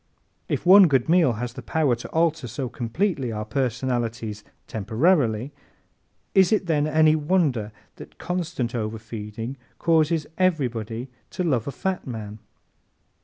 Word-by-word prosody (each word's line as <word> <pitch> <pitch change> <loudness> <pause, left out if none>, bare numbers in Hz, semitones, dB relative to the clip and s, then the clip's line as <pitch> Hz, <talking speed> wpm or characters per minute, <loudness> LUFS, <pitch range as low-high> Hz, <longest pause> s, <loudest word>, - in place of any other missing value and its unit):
If - - -2
one 190 +1 +9
good 135 -5 +2
meal 165 -7 +4
has 120 +2 -4
the 130 - -8
power 150 -5 +1
to 120 - -8
alter 160 -4 +1
so 120 +3 -4
completely 130 - -1
our 105 -1 -4
personalities 120 -3 -2 0.2
temporarily, 115 - +1 0.8
is 190 0 +5
it 215 -3 +2
then 155 -3 +1
any 155 0 +4
wonder 150 - +1 0.3
that - - -12
constant 165 -9 -3
overfeeding 110 +1 -5 0.2
causes 160 -1 +2
everybody 120 - 0 0.2
to 180 - -3
love 135 -9 0
a - - -2
fat 185 +6 -3
man? 110 -3 -6
130 Hz, 130 wpm, -24 LUFS, 115-160 Hz, 0.8 s, one